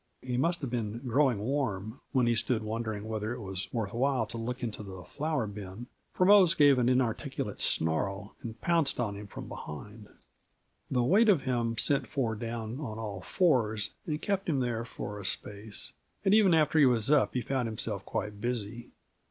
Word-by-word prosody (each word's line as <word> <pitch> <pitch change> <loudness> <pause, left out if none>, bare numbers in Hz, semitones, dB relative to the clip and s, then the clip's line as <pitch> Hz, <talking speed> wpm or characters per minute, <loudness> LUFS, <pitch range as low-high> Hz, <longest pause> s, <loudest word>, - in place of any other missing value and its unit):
He 125 -1 -2
must 170 +7 +1
have 135 -4 -3
been 115 -1 -2
"growing 130 -1 +3
warm" 110 -1 -2
when 130 -3 +3
he 120 - +3
stood 115 0 +1
wondering 110 -1 -3
whether 110 +1 -2
it - - -8
was 95 -3 -5
worth 110 -5 -2
while 130 +2 +1
to 115 - -7
look 125 +3 -4
into 115 -2 -3
the 95 -3 -8
flour 150 - -2
bin, 100 +2 -7 0.3
for 180 - +2
Mose 195 -3 +7
gave 145 -3 +6
an 125 0 +3
inarticulate 125 -3 -1
snarl 95 +5 0
and 115 -1 -7
pounced 165 -6 +2
on 110 -4 0
him 100 0 -8
from - - -8
behind. 105 +8 -8 0.8
The 125 -2 +2
weight 205 - +5
of 170 -10 +4
him 120 -3 0
sent 140 +4 +1
Ford 115 -6 -1
down 115 +1 -4
on 110 -8 -5
all 105 -4 -5
fours 115 - +2 0.2
and 150 -2 -1
kept 195 -1 -1
him 145 -4 +2
there 120 -2 -1
for 105 -3 -6
a - - -7
space, 105 +2 -4 0.3
and 195 - +5
even 205 -5 +6
after 155 0 +3
he 140 - +7
was 120 +1 +2
up 150 -3 +4
he 125 - +1
found 130 -3 -1
himself 110 -1 -3
quite 105 -1 -4
busy. 120 -1 -3
120 Hz, 190 wpm, -30 LUFS, 105-135 Hz, 0.8 s, Mose